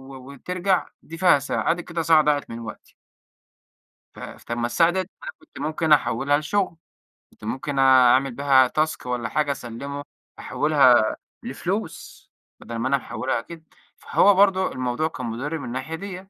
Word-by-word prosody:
و 130 Hz, +1 st, -11 dB
وترجع، 180 Hz, +6 st, -1 dB, 0.2 s
دي 165 Hz, -, -10 dB
فيها 175 Hz, -5 st, +4 dB
ساعة. -, -, -1 dB
آدِي 175 Hz, +1 st, -3 dB
كده 170 Hz, 0 st, -4 dB
ساعة 160 Hz, -1 st, +4 dB
ضاعت 145 Hz, -1 st, 0 dB
من 115 Hz, 0 st, -7 dB
وقتي. 115 Hz, -, -10 dB, 1.2 s
ف -, -, -14 dB
فما 120 Hz, 0 st, -5 dB
الساعة 165 Hz, +8 st, +3 dB
دي 190 Hz, -, -2 dB
أنا 185 Hz, +1 st, -4 dB, 0.3 s
كنت -, -, -15 dB
ممكن 155 Hz, +2 st, -2 dB
أحولها 145 Hz, 0 st, +3 dB
لشغل، 185 Hz, +4 st, -1 dB, 0.6 s
كنت -, -, -24 dB
ممكن 135 Hz, +5 st, -3 dB
أعمل 130 Hz, 0 st, +5 dB
بيها 135 Hz, -1 st, +4 dB
task 155 Hz, +1 st, -2 dB
والَّا 125 Hz, -2 st, -3 dB
حاجة، 150 Hz, -2 st, 0 dB
أسلمه 140 Hz, +3 st, -6 dB, 0.4 s
أحولها 130 Hz, -7 st, +3 dB, 0.3 s
لفلوس، -, -, -5 dB, 0.3 s
بدل 115 Hz, -, -8 dB
ما 115 Hz, +3 st, -2 dB
أنا 140 Hz, -, +2 dB
محولها 130 Hz, -2 st, -3 dB
كده. 160 Hz, +6 st, -12 dB, 0.3 s
فهو 205 Hz, -, +3 dB
برضو 190 Hz, -1 st, +3 dB
الموضوع 130 Hz, +4 st, -2 dB
كان 130 Hz, -5 st, -7 dB
مضر 130 Hz, +8 st, -4 dB
من 145 Hz, -, -7 dB
الناحية 130 Hz, +6 st, -5 dB
ديَّة. 190 Hz, +1 st, -8 dB
145 Hz, 160 wpm, -23 LUFS, 125-165 Hz, 1.2 s, أعمل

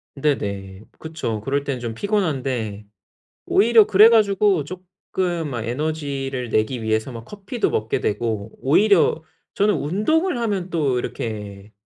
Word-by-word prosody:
네네. 100 Hz, -9 st, -2 dB, 0.2 s
그쵸. 135 Hz, -9 st, -4 dB
그럴 140 Hz, +4 st, -1 dB
때는 135 Hz, -3 st, -3 dB
좀 115 Hz, -2 st, -5 dB
피곤한데 130 Hz, -, -2 dB, 0.6 s
오히려 220 Hz, +1 st, +5 dB
그래 210 Hz, +2 st, +7 dB
가지고 200 Hz, -6 st, +3 dB
쪼끔 180 Hz, -1 st, -4 dB
막 120 Hz, -4 st, -4 dB
에너지를 135 Hz, -2 st, -3 dB
내기 110 Hz, +3 st, 0 dB
위해서 110 Hz, +3 st, -1 dB
막 115 Hz, -1 st, -9 dB
커피도 205 Hz, -, -3 dB
먹게 110 Hz, +1 st, -1 dB
되고 110 Hz, 0 st, -2 dB
오히려 165 Hz, +2 st, +3 dB, 0.3 s
저는 205 Hz, +1 st, +2 dB
운동을 240 Hz, -, 0 dB
하면 200 Hz, -6 st, -2 dB
또 145 Hz, -7 st, 0 dB
이렇게 105 Hz, -3 st, -6 dB
140 Hz, 280 characters per minute, -22 LUFS, -, 0.6 s, 그래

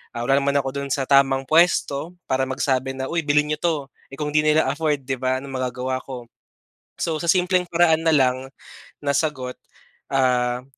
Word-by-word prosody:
Ah, 120 Hz, -, -3 dB
wala 135 Hz, +3 st, +3 dB
naman 140 Hz, 0 st, 0 dB
ako 135 Hz, -1 st, +1 dB
do'n 140 Hz, 0 st, -4 dB
sa 135 Hz, 0 st, -1 dB
tamang 135 Hz, 0 st, +3 dB
puwesto 160 Hz, +1 st, +2 dB
para 130 Hz, 0 st, -1 dB
magsabi 130 Hz, 0 st, -1 dB
na, 130 Hz, -, -4 dB
"Uy 170 Hz, -, 0 dB
bilhin 150 Hz, +1 st, +2 dB
niyo 150 Hz, -, 0 dB
'to," 170 Hz, -2 st, +1 dB, 0.4 s
eh -, -, -5 dB
kung 150 Hz, +1 st, -3 dB
'di 150 Hz, 0 st, +2 dB
nila 155 Hz, +1 st, +4 dB
afford 150 Hz, 0 st, -1 dB
'di 135 Hz, 0 st, -3 dB
ba, 130 Hz, +1 st, -1 dB
anong 140 Hz, -, -8 dB
magagawa 130 Hz, +1 st, -2 dB
ko. 125 Hz, -3 st, -7 dB, 0.8 s
So 160 Hz, -2 st, -1 dB
sa 170 Hz, -, -5 dB
simpleng 180 Hz, +1 st, +2 dB
paraan 165 Hz, -2 st, +2 dB
na 160 Hz, -, +4 dB
lang 130 Hz, -2 st, +2 dB, 0.6 s
na 140 Hz, -, +1 dB
sagot, 130 Hz, -4 st, -1 dB, 0.6 s
ah, 125 Hz, -2 st, +1 dB
140 Hz, 190 wpm, -22 LUFS, 130-155 Hz, 0.8 s, nila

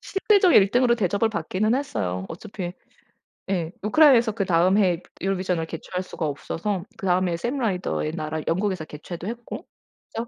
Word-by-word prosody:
실질적 390 Hz, -2 st, +3 dB
1 195 Hz, -1 st, +6 dB
등으로 245 Hz, -1 st, +4 dB
대접을 205 Hz, 0 st, +1 dB
받기는 210 Hz, +4 st, 0 dB
했어요. 95 Hz, -, -2 dB
어차피 185 Hz, 0 st, -6 dB, 0.8 s
예. 175 Hz, -4 st, -1 dB
우크라이나에서 235 Hz, 0 st, +5 dB
그다음 185 Hz, -2 st, +3 dB
해에 180 Hz, -4 st, +2 dB, 0.2 s
유로비전을 185 Hz, -3 st, -1 dB
개최할 180 Hz, +3 st, -5 dB
수가 170 Hz, -, -5 dB
없어서 170 Hz, +6 st, -3 dB
그다음 185 Hz, -2 st, +1 dB
해에 170 Hz, -, -1 dB
샘 245 Hz, +10 st, -2 dB
라이더의 185 Hz, -8 st, -1 dB
나라 155 Hz, -1 st, -3 dB
영국에서 185 Hz, 0 st, 0 dB
개최도 170 Hz, +4 st, -8 dB
했고 235 Hz, +1 st, -6 dB, 0.5 s
저 230 Hz, +1 st, -3 dB
190 Hz, 385 characters per minute, -24 LUFS, 170-225 Hz, 0.8 s, 1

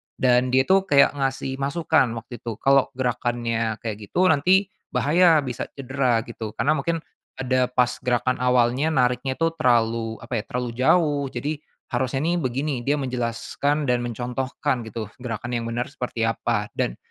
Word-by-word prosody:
Dan 125 Hz, 0 st, +3 dB
dia 130 Hz, +1 st, +3 dB
itu 190 Hz, +6 st, +3 dB
kayak 140 Hz, -1 st, +5 dB
ngasih 135 Hz, -1 st, -2 dB
masukan 140 Hz, -3 st, +1 dB
waktu 120 Hz, +1 st, -8 dB
itu 115 Hz, -2 st, -5 dB
kalau 135 Hz, +1 st, +4 dB
gerakannya 120 Hz, -3 st, -1 dB
kayak 110 Hz, -3 st, -4 dB
gitu 180 Hz, -, +1 dB
nanti 185 Hz, +6 st, +3 dB, 0.2 s
bahaya 165 Hz, 0 st, +4 dB
bisa 125 Hz, -3 st, -4 dB
cedera 130 Hz, -4 st, 0 dB
gitu 115 Hz, -2 st, -7 dB
karena 145 Hz, -, +1 dB
mungkin 160 Hz, +2 st, -1 dB, 0.3 s
ada 130 Hz, -1 st, +1 dB
pas 125 Hz, 0 st, +1 dB
gerakan 125 Hz, 0 st, 0 dB
awalnya 125 Hz, +3 st, +2 dB
nariknya 125 Hz, +1 st, +1 dB
itu 165 Hz, +2 st, +1 dB
terlalu 115 Hz, -4 st, +2 dB
apa 115 Hz, -1 st, -2 dB
ya, -, -, -5 dB
terlalu 125 Hz, -1 st, -3 dB
jauh, 145 Hz, +4 st, +2 dB
jadi 145 Hz, +4 st, -4 dB, 0.3 s
harusnya 130 Hz, +2 st, -1 dB
nih 170 Hz, +2 st, +1 dB
begini. 135 Hz, +1 st, -1 dB
Dia 145 Hz, -, +3 dB
menjelaskan 130 Hz, +2 st, -1 dB
dan 125 Hz, -3 st, +1 dB
mencontohkan 125 Hz, +1 st, -3 dB
gitu 110 Hz, -1 st, -6 dB
gerakan 120 Hz, -1 st, -5 dB
yang 115 Hz, -1 st, -2 dB
benar 120 Hz, +3 st, -3 dB
seperti 125 Hz, -5 st, -3 dB
apa 115 Hz, -2 st, -1 dB
dan, -, -, 0 dB
125 Hz, 160 wpm, -24 LUFS, 120-140 Hz, 0.3 s, kayak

